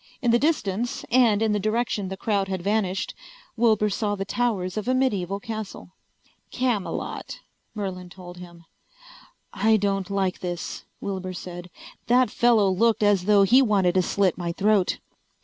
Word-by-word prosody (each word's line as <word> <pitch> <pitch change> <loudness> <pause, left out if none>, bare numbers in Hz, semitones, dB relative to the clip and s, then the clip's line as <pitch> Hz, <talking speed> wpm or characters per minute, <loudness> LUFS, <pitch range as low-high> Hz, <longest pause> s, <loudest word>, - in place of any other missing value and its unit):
In 240 -4 +1
the 235 - +4
distance, 240 - -1
and 225 -4 +4
in 220 - +2
the 210 - +1
direction 215 -1 -1
the 190 +1 -6
crowd 200 -2 0
had 190 -2 -4
vanished, 195 -2 -1 0.4
Wilbur 220 -3 +2
saw 205 +1 -1
the 195 -1 -4
towers 200 -5 -1
of 215 +1 -4
a 255 - +2
medieval 200 -7 0
castle. 215 -4 -7 0.6
"Camelot," 245 -6 -3 0.3
Merlin 185 -3 -5
told 175 -1 -11
him. 170 -1 -12 0.9
"I 220 +2 +3
don't 195 -2 -1
like 195 -2 -1
this," 175 -1 -5 0.2
Wilbur 185 -2 -4
said. 175 0 -8 0.4
"That 250 +1 +3
fellow 235 -4 +3
looked 220 +3 +2
as 200 -3 +3
though 205 -1 +5
he 245 +7 +6
wanted 200 -7 +2
to 185 - +3
slit 185 0 0
my 170 -1 -2
throat." 200 0 +2
200 Hz, 155 wpm, -24 LUFS, 185-225 Hz, 0.9 s, he